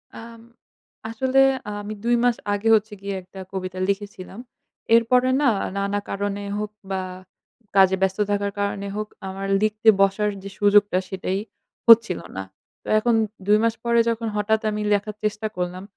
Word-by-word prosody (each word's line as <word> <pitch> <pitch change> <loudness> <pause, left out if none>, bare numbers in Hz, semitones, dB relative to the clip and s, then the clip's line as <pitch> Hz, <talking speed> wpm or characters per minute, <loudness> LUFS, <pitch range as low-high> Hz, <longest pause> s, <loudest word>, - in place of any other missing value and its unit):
আম 230 0 -11 0.7
আসলে 260 +4 +1 0.4
আমি 205 +1 -6
২ 240 +1 +3
মাস 245 -1 +3 0.2
আগে 205 +2 -2
হচ্ছে 215 0 -1
গিয়ে 200 0 -4
একটা 185 +1 -13
কবিতা 185 -1 -5
লিখেছিলাম। 200 0 -4 0.6
এরপরে 250 +2 +3
না - - +2 0.3
নানা 200 +1 -1
কারণে 200 0 -3 0.2
হোক 210 0 -4 0.2
বা 190 -1 -1 0.7
কাজে 190 -1 +6
ব্যস্ত 190 0 +1
থাকার 200 0 0
কারণে 200 0 -2
হোক 215 0 -3 0.2
আমার 195 +1 -5
লিখতে 215 +1 -1
বসার 195 +2 +2
যে 200 - -7
সুযোগটা 205 -2 +4
সেটাই 190 0 -2 0.5
হচ্ছিল 230 -5 +7 0.2
না। 95 - -3 0.4
তো - - -16
এখন 235 +1 +2 0.3
২ 210 +1 +5
মাস 230 -1 +2
পরে 235 0 +2
যখন 230 0 -2
হঠাৎ 215 +1 +1
আমি 210 0 -3
লেখার 205 +1 0
চেষ্টা 215 +1 -1
করলাম 180 +1 -3
205 Hz, 155 wpm, -23 LUFS, 195-225 Hz, 0.7 s, হচ্ছিল